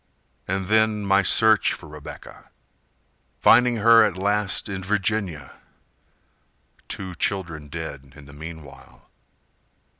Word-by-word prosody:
And 95 +1 -2
then 110 0 +1
my 100 0 +4
search 110 +1 +3
for 85 - -10
Rebecca, 75 -1 -12 0.9
Finding 125 -1 +5
her 115 +1 +6
at 100 -4 -1
last 100 +1 -1
in 95 -2 -5
Virginia, 100 -4 -3 1.3
Two 95 -2 -6
children 85 -4 -3
dead 70 -4 -8
in 75 -2 -14
the 70 - -14
meanwhile. 80 -1 -12
95 Hz, 110 wpm, -23 LUFS, 80-105 Hz, 1.3 s, her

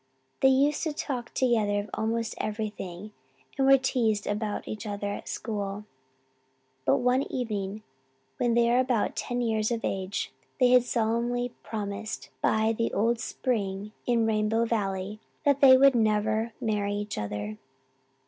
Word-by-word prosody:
They 265 - +5
used 275 +3 +3
to 315 - -1
talk 255 -5 -4
together 220 -5 +2
of 205 -1 -11
almost 225 +1 -1
everything 210 -3 -4 0.4
and 270 -1 +2
were 270 0 +8
teased 230 -5 0
about 210 0 -2
each 215 +1 -5
other 205 0 -4
at - - -6
school; 205 -2 -4 1.0
but 135 +1 +4
one 250 +2 +1
evening 210 -4 -3 0.5
when 240 -1 +1
they 235 0 +4
were 245 - +4
about 250 -4 +1
ten 245 0 -2
years 220 -2 +1
of 230 -1 -2
age 190 0 -2 0.3
they 250 -2 +5
had 250 0 +7
solemnly 240 +1 0
promised, 215 0 -5
by 220 +1 +2
the 230 +1 0
old 230 +3 +2
spring 210 -4 -2 0.2
in 235 -2 +3
Rainbow 220 +1 +1
Valley, 205 -2 -2 0.3
that 280 0 +3
they 260 -2 +9
would 275 +1 +6
never 220 0 +1
marry 210 -4 -1
each 205 0 -4
other. 105 +1 -4
220 Hz, 150 wpm, -28 LUFS, 205-245 Hz, 1.0 s, they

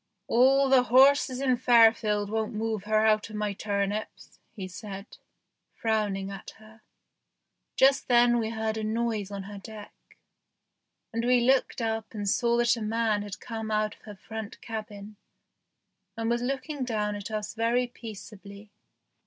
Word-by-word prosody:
"All 270 +3 +4
the 265 -1 +5
horses 260 +1 +5
in 255 -2 +2
Fairfield 225 -4 +4
won't 220 -1 -2
move 220 -2 -2
her 215 0 +2
out 215 0 +2
of 215 - -9
my 210 -1 -2
turnips," 200 +1 -4 0.2
he 190 -4 -6
said, 195 +2 -8 0.7
frowning 205 -3 -1
at 195 - -9
her. 220 0 -18 0.9
Just 270 +1 +4
then 240 -1 +4
we 220 -1 -1
heard 220 -1 -2
a 220 - -3
noise 220 -2 -1
on 200 -1 -6
her 200 +1 -9
deck, 210 0 -10 1.2
and 230 +1 -1
we 250 +1 +4
looked 260 -1 +2
up 225 0 -3
and 205 -1 -3
saw 235 +4 +2
that 240 0 +3
a 230 - -7
man 220 -1 0
had 205 0 -7
come 225 -2 -6
out 215 0 0
of - - -29
her 210 -1 -9
front 220 +2 -8
cabin 210 -2 -8 1.0
and 225 0 -1
was 235 0 0
looking 275 +2 -3
down 210 -4 -1
at 205 +1 -6
us 215 -1 -4
very 230 +2 +1
peaceably. 210 -3 -11
220 Hz, 155 wpm, -27 LUFS, 210-235 Hz, 1.2 s, the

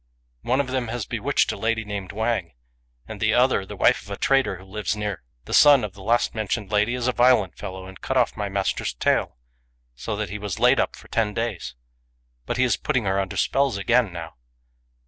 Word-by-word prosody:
" - - -44
One 130 - +3
of 140 - +2
them 130 -2 -1
has 115 -2 -4
bewitched - - 0
a - - -5
lady 115 0 -1
named 100 -3 -5
Wang; 110 - -2 0.5
and - - -8
the - - +2
other, - - +3
the - - -7
wife - - +3
of 100 - -15
a 100 - -5
trader 135 -7 +2
who 95 - -12
lives 100 +1 -3
near. 105 -5 -4 0.2
The - - -6
son 145 -4 +7
of 105 -3 -4
the 100 - -13
last 115 +5 +1
mentioned 110 -1 -3
lady 105 +3 +2
is 125 -1 -2
a - - +3
violent 120 -7 +3
fellow, 95 0 -7
and 95 0 -12
cut 130 - -1
off 125 - +2
my 105 -2 -3
master's 100 -9 -2
tail, - - 0 0.6
so 105 - -5
that 100 -3 -4
he 105 - -5
was 100 -3 -4
laid - - +5
up - - 0
for - - -15
ten 105 -3 -1
days. 115 - -3 0.7
But 120 - -2
he 130 - +3
is 125 - +2
putting 125 - -1
her 95 0 +1
under 95 -1 -3
spells 135 -5 +1
again 115 +1 +2
now." 85 -5 -8
105 Hz, 225 wpm, -24 LUFS, 95-120 Hz, 0.7 s, son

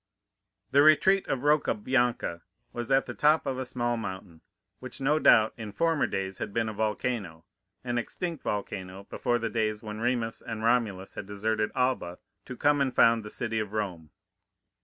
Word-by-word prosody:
The 140 - +6
retreat 170 +6 +5
of 135 -1 -2
Rocca 150 -4 +3
Bianca 120 -7 0 0.3
was 120 0 -5
at 135 0 +3
the - - -6
top 150 +2 +3
of 130 -1 -2
a 130 - -3
small 120 -1 -1
mountain, 95 -6 -7 0.4
which 130 -1 -8
no 145 +3 +2
doubt 110 -7 +5
in 110 -3 -6
former 165 +4 +1
days 95 0 -4
had - - -4
been 115 -1 +1
a 110 - -4
volcano—an 105 0 -4
extinct 165 +5 -4
volcano 95 -2 -4
before 120 -2 0
the 115 -2 -3
days 110 -1 -1
when 105 0 -6
Remus 120 -1 -1
and 110 -1 -6
Romulus 110 -5 0
had - - -7
deserted 105 +1 -1
Alba 125 -9 0 0.3
to 125 - -7
come 145 -1 +3
and 135 -2 +1
found 115 0 +5
the 105 - -8
city 115 0 -2
of 105 -1 -4
Rome. 90 -7 -3
115 Hz, 175 wpm, -28 LUFS, 105-130 Hz, 0.4 s, The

